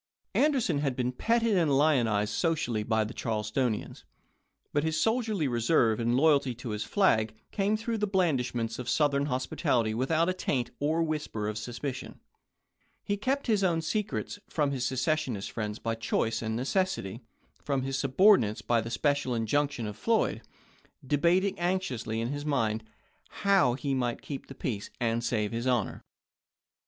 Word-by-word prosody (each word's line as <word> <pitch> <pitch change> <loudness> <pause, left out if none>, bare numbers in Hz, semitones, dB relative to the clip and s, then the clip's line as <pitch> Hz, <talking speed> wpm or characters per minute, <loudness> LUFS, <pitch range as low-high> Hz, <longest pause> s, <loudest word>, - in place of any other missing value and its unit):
Anderson 260 - +2
had 140 -3 -1
been 125 0 0
petted 230 - +1
and 155 -7 +3
lionized 120 -9 +2
socially 150 -10 0
by 110 0 +1
the 110 +3 -6
Charlestonians; 110 +1 -2 0.7
but 145 - +2
his 160 -1 0
soldierly 220 - +1
reserve 120 -2 +2
and 120 +1 +1
loyalty 140 -4 +3
to 120 0 -7
his 105 -1 -2
flag 110 - +2 0.2
came 205 +1 +1
through 225 0 -3
the 210 - +1
blandish 160 -11 +1
ments 115 0 -2
of 125 -1 -4
Southern 145 -2 +2
hospitality 125 -3 0
without 155 +8 +1
a 185 - +1
taint 130 -9 -1
or 155 +3 +1
whisper 150 -9 -3
of 105 - -3
suspicion. 125 +4 -5 0.8
He 205 - -1
kept 265 +7 -1
his 215 -5 +2
own 165 -3 +1
secrets, 210 +3 -2
from 145 -3 0
his 130 -3 -2
secession 130 -2 0
friends 105 +1 -4
by 115 0 -2
choice 115 0 -1
and 110 -1 -2
necessity, 130 - -1 0.4
from 135 -2 -1
his 135 0 -2
subordinates 135 - +4
by 120 -1 +2
the 115 - -6
special 140 +1 0
injunction 130 +2 0
of 105 -1 -5
Floyd; 225 - +1 0.6
debating 175 +8 +2
anxiously 155 -12 -1
in 115 - -2
his 145 +1 -3
own 150 - -3
mind 110 -6 0 0.5
how 195 -12 +3
he 140 +1 -2
might 125 -2 -1
keep 140 -2 -6
the 135 - -10
peace 105 -6 -4
and 115 0 0
save 110 -3 0
his 115 +2 -2
honor. 120 -5 0
135 Hz, 160 wpm, -29 LUFS, 115-165 Hz, 0.8 s, subordinates